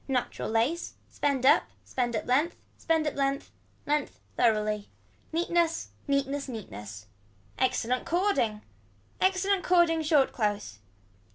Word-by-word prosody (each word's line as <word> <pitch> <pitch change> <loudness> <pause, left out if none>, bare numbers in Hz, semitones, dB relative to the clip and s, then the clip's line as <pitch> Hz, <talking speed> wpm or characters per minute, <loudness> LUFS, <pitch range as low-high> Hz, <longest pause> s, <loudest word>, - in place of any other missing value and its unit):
Natural 260 -3 -2
lace. 235 +10 0
Spend 275 -3 -1
up. 290 +4 +6 0.2
Spend 245 -2 -1
up 215 - -2
length. 290 +7 +2 0.2
Spend 320 -1 +1
up 300 - 0
length. 275 0 -1 0.3
Length 295 -1 -1 0.2
thoroughly. 215 -3 +1 0.4
Neatness. 335 0 +1 0.2
Neatness 280 0 0
Neatness. 105 - -8 0.5
Excellent 255 -1 +1
cording. 340 - +1 0.6
Excellent 385 0 +2
cording 345 -3 +4
short 300 -3 +3
close. 205 - -2
275 Hz, 110 wpm, -28 LUFS, 225-325 Hz, 0.6 s, up